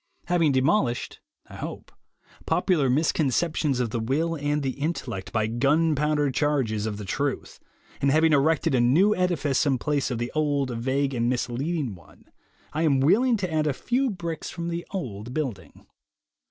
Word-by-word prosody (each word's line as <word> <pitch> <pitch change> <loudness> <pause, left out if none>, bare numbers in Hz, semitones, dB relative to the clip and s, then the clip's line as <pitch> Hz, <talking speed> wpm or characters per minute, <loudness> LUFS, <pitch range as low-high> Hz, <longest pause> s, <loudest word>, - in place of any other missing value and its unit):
Having 170 -5 +2
demolished 130 - +1 0.3
(I - - -11
hope) - - -7 0.6
popular 155 -9 +2
misconceptions 150 0 +1
of 120 -3 -1
the 115 - -1
will 145 +9 0
and 145 -1 -1
the 135 - 0
intellect 140 - -4
by 110 -1 +1
gunpowder 145 +4 +1
charges 130 -8 0
of 105 -2 -4
the 105 - -7
truth, 140 +8 -3 0.4
and 140 - +3
having 155 +2 +4
erected 145 +1 +2
a 125 - +3
new 170 +13 +4
edifice 165 -7 +1
in 135 -2 +2
place 145 +2 -1
of 125 - -2
the 120 +1 -3
old, 145 -4 0
vague, 135 +4 0
and 120 -1 0
misleading 125 +2 -2
one, 90 - -17 0.5
I 155 - -1
am 145 -5 +3
willing 225 - +4
to 185 -5 -3
add 155 -1 +1
a 145 - +1
few 250 - 0
bricks 170 -6 -5
from 170 0 -5
the 170 0 -4
old 125 - -5
building. 140 -9 -5
145 Hz, 165 wpm, -25 LUFS, 125-160 Hz, 0.6 s, having